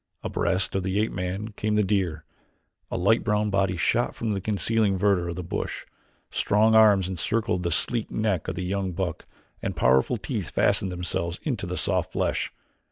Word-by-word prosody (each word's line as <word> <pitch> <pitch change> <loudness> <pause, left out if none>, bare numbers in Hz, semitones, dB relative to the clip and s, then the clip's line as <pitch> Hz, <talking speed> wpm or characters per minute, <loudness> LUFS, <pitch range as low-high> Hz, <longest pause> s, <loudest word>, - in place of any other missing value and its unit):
Abreast 95 0 0
of 95 - 0
the 95 +2 -1
ape 110 - 0
man 95 +4 -3
came 105 0 -2
the 105 - +3
deer; 95 -6 -1 0.6
a - - -3
light 100 +6 +3
brown 105 0 +1
body 95 -2 +1
shot 120 +7 +1
from 110 -2 -2
the 100 - -2
concealing 105 0 +1
verdure 95 -3 +2
of 85 - -4
the 90 - -5
bush, 85 - -4 0.5
strong 110 +2 +3
arms 105 -4 +6
encircled 95 +2 0
the 85 - -1
sleek 115 +7 +1
neck 105 -6 -1
of 95 - -3
the 90 +1 -3
young 95 0 -2
buck 90 -2 -4 0.3
and - - -3
powerful 65 0 +3
teeth - - -4
fastened 95 - +1
themselves 90 -1 -2
in - - 0
the - - -4
soft - - 0
flesh. - - -1
95 Hz, 180 wpm, -26 LUFS, 90-105 Hz, 0.6 s, arms